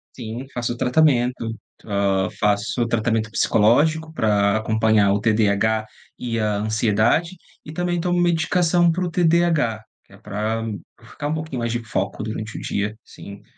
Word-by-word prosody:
Sim, 120 +1 -6
faço 120 0 -3
tratamento, 125 -4 +1 0.3
hã, 100 -2 0
faço 105 +3 +1
tratamento 110 -1 0
psicológico 155 +11 +2
pra 105 -5 +2
acompanhar 110 -2 +2
o 100 - 0
TDAH 110 0 +1 0.3
e 115 -2 -3
a 105 -1 0
ansiedade 110 - +1 0.3
e 155 - -9
também 175 +1 -1
tomo 175 +1 0
medicação 175 0 +2
para 180 +3 -1
o 175 - -3
TDAH, 165 -10 +2 0.2
que - - -25
é - - -13
pra 110 +2 -3 0.4
eu 115 - -18
ficar 145 +5 -6
um 150 - -1
pouquinho 155 -5 -4
mais 115 0 -2
de 120 0 -3
foco 100 -2 -3
durante 110 0 -5
o - - -8
dia, 105 +2 -3
sim. 100 0 -12
115 Hz, 155 wpm, -22 LUFS, 110-155 Hz, 0.4 s, psicológico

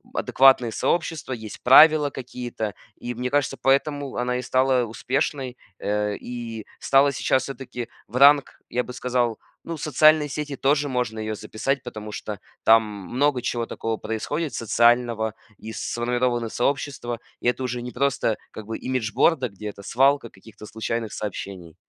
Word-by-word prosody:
адекватные 130 -3 +4
сообщества, 160 0 -1
есть 110 -3 -8
правила 150 +3 +7
какие-то. 120 -5 -5 0.2
И, 120 - -5
мне 125 +1 -3
кажется, 140 0 +1
поэтому 140 +1 +1
она 125 0 -1
и - - -2
стала 130 0 +2
успешной, 130 +2 -2 0.2
э, 105 0 -1
и 115 -3 -7
стала 140 +1 +4
сейчас 130 0 +1
всё-таки 125 -3 -6 0.2
в 115 - -12
ранг, 140 0 +5
я 125 +1 0
бы 125 - -9
сказал, 125 -2 0 0.3
ну, 165 - -5
в 145 - -10
социальные 155 0 +4
сети 145 0 -4
тоже 145 +2 +1
можно 125 -4 -2
ее 110 0 -3
записать. 115 +6 -2
Потому 110 -4 -7
что 105 -1 -6 0.2
там 115 0 +7
много 120 +6 -1
чего 120 -2 -2
такого 115 -1 -3
происходит 135 +9 -3
социального, 115 -1 +2 0.2
и 110 - -8
сформированы 120 0 -1
сообщества, 125 -2 -2 0.2
и - - -1
это 125 +1 +1
уже 125 -1 -3
не 125 - -6
просто 125 -4 0
как 110 - -9
бы 110 +1 -5
имиджборда, 130 +2 +1
где 105 +2 -8
это 100 0 -11
свалка 135 +2 +2
каких-то 105 +2 -14
случайных 110 0 -3
сообщений. 95 -5 -6
125 Hz, 155 wpm, -24 LUFS, 110-135 Hz, 0.3 s, правила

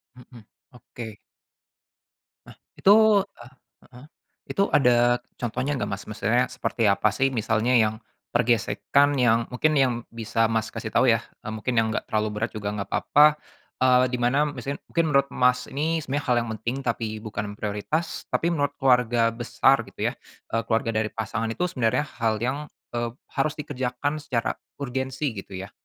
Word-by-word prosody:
Mhm, 120 -3 -15 0.3
oke. 115 -3 -10 1.3
Nah - - -14 0.2
itu, 195 - +5 0.5
ah, 120 +2 -13 0.4
heeh, 125 +3 -14 0.5
itu 195 - +2
ada 120 -2 +4 0.2
contohnya 125 +4 -2
nggak, - - -2
Mas? 100 - -4
Maksudnya 110 +4 +1
seperti 115 -1 -1
apa 105 +1 +3
sih 130 +7 +1
misalnya 110 +2 +1
yang, 110 -2 +4 0.4
pergesekan 120 +4 +2
yang 115 -2 +3
mungkin 140 +5 +1
yang 130 -2 +3 0.2
bisa 115 0 0
Mas 110 0 0
kasih 110 -1 -6
tahu 130 - +4
ya, 115 -1 +3 0.2
eee, 110 - -6
mungkin 110 +4 -2
yang 110 - +2
gak - - -1
terlalu 110 0 +1
berat 110 +2 -2
juga 105 -2 -5
gak 100 -1 -4
apa-apa, 150 +1 +5 0.5
eee, 130 0 +5
di 125 - -1
mana 130 +5 +3
misalnya 140 +1 -6
mungkin 170 -1 +2
menurut 140 -2 +3
Mas 125 0 +1
ini 160 +3 -1
sebenarnya 145 +2 -3
hal 125 - +3
yang 115 - -7
penting 120 +3 -2
tapi 110 -2 -3
bukan 105 -1 -5
prioritas 105 +11 -3
tapi 170 +1 0
menurut 145 -3 -1
keluarga 125 -4 +3
besar 125 +3 +2
gitu - - -2
ya, - - -11 0.4
eee, 115 - +1
keluarga 115 0 +1
dari 110 - 0
pasangan 115 +1 -2
itu 115 +10 -2
sebenarnya 125 +2 +1 0.2
hal 110 -1 +2
yang, 140 +4 -2 0.2
eee, 120 0 -3 0.2
harus 150 +2 +2
dikerjakan 145 +1 -3
secara 130 -6 -1 0.3
urgensi 130 +2 -2
gitu 100 -2 -9
ya. 95 +3 -7
120 Hz, 165 wpm, -25 LUFS, 110-135 Hz, 1.3 s, itu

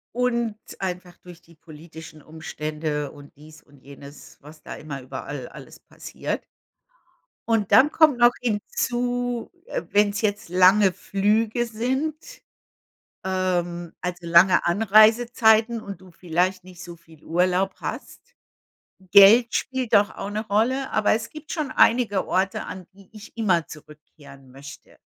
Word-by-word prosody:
Und 235 -3 -1 0.2
einfach 180 -1 -5
durch 175 -1 -15
die 170 - -22
politischen 160 0 -13
Umstände 155 -1 -5
und 145 -1 -15
dies 155 +1 -16
und 145 -2 -22
jenes, 140 +1 -14
was 150 +2 -15
da - - -9
immer 140 -3 -8
überall 130 +1 -7
alles - - -14
passiert. - - -7 1.1
Und 220 -3 0
dann 285 +3 +6
kommt 310 -6 +4
noch 240 0 +6
hinzu, 245 +2 -2
äh, - - -4
wenn's 205 +1 +1
jetzt 205 -4 -2
lange 185 +2 +4
Flüge 215 +4 0
sind, 260 +7 -2 1.1
ähm, 175 -2 -2
also 180 0 -4
lange 170 +2 +5
Anreisezeiten 220 +3 +3
und 195 -3 -9
du 185 - -16
vielleicht 180 +2 -2
nicht 180 -1 -13
so 175 -1 -10
viel 160 -2 -21
Urlaub 185 +3 0
hast. - - -7 0.9
Geld 215 +4 +7
spielt 260 -3 -2
doch 205 +1 +4
auch - - -6
'ne 215 +2 -5
Rolle, 250 +6 0
aber 215 -1 +1
es 225 +1 -4
gibt 305 -1 -10
schon 300 -5 -3
einige 225 -5 +2
Orte, 190 +1 -1
an 185 -2 -9
die 195 0 -20
ich 215 +1 -14
immer 185 -8 +1
zurückkehren 150 -3 -15
möchte. 140 +2 -14
190 Hz, 135 wpm, -23 LUFS, 165-225 Hz, 1.1 s, Geld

